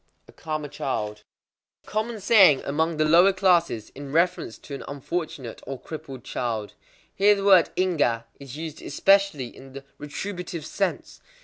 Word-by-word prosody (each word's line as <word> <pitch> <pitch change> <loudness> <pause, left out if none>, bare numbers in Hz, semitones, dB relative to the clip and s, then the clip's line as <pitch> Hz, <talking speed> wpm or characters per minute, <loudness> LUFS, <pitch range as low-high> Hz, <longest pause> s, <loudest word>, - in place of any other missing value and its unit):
_ - - -47 0.2
A - - -15
karma 155 -2 -5
child. 105 -7 -4 0.6
A - - -29
common 220 +1 -2
saying 190 - +6
among 160 +3 0
the 155 - +2
lower 175 +5 +6
classes 175 - +1
in 140 0 -8
reference 170 -6 0
to 145 - -11
an 140 - -6
unfortunate 145 -3 -5
or 135 -1 -5
crippled 140 -6 -9
child. 110 -4 -3 0.4
Here 205 +1 +4
the 200 0 -4
word 190 -4 +6
ingwa 150 -11 +1 0.2
is 140 0 -9
used 160 -1 -7
especially 195 -11 +2
in 135 0 -13
the 140 0 -9 0.2
retributive 170 +2 -6
sense. 195 +2 -3
155 Hz, 155 wpm, -25 LUFS, 135-185 Hz, 0.6 s, saying